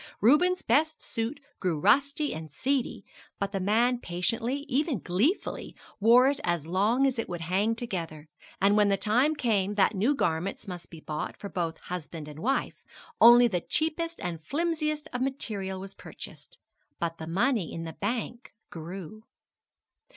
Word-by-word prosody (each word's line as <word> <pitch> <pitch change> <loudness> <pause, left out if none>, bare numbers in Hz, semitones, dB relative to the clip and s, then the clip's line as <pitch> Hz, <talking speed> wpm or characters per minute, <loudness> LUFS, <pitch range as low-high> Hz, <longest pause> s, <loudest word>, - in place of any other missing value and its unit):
Reuben's 355 - +4
best 315 +1 +2
suit 230 +6 -3 0.2
grew 175 -5 0
rusty 285 - +3
and 160 -1 -7
seedy, 265 - -1 0.3
but 200 0 -2
the 195 - -2
man 230 +6 +2
patiently, 230 +10 -2
even 290 0 +1
gleefully, 220 - -1 0.2
wore 235 +4 +7
it 275 +1 +2
as 175 -3 0
long 210 +10 +2
as 260 -3 +1
it 230 - -3
would 175 -2 -4
hang 195 +7 +1
together; 165 -10 -5 0.3
and 200 +1 +4
when 210 -1 +4
the 195 - +3
time 250 +10 +2
came 205 -7 +1
that 205 0 +3
new 220 +9 +2
garments 170 -4 -1
must 180 -2 -7
be 165 -2 -11
bought 155 0 -4
for 200 - -7
both 165 -4 -2
husband 165 -3 -6
and 150 0 -9
wife, 265 +9 -1 0.4
only 240 +1 +9
the 180 -6 -1
cheapest 330 - -1
and 170 -2 -4
flimsiest 305 - -1
of 250 - -2
material 210 -8 -3
was 195 +1 -7
purchased - - -11 0.4
but 165 -1 -2
the 160 - -6
money 205 - +1
in 165 - -5
the 160 -1 -6
bank 235 +4 -4 0.2
grew. 180 +5 -8
210 Hz, 160 wpm, -28 LUFS, 175-265 Hz, 0.4 s, only